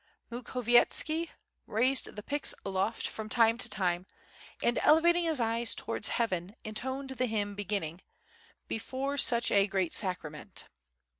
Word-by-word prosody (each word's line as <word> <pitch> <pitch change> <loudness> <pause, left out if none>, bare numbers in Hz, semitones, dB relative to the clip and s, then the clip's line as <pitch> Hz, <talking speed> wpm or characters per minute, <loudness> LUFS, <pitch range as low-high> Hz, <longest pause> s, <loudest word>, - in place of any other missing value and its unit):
Mukhovietski 250 +7 +2 0.4
raised 255 +5 +1
the 210 - -7
pix 290 +4 +1
aloft 195 +3 -1
from 215 -1 -7
time 230 0 +3
to - - +5
time 180 -3 -1 0.6
and 240 - +2
elevating 340 +3 +4
his 320 -4 +2
eyes 230 0 +1
towards - - -2
heaven 190 -4 -2
in 215 - -6
toned 265 +4 -4
the 255 -1 -1
hymn 205 -2 -2
beginning 195 -4 -3 0.7
"Before 265 +5 -3
such 235 -2 +3
a 200 0 +4
great 190 -4 -1
Sacrament." 170 -7 -4
230 Hz, 135 wpm, -30 LUFS, 200-260 Hz, 0.7 s, to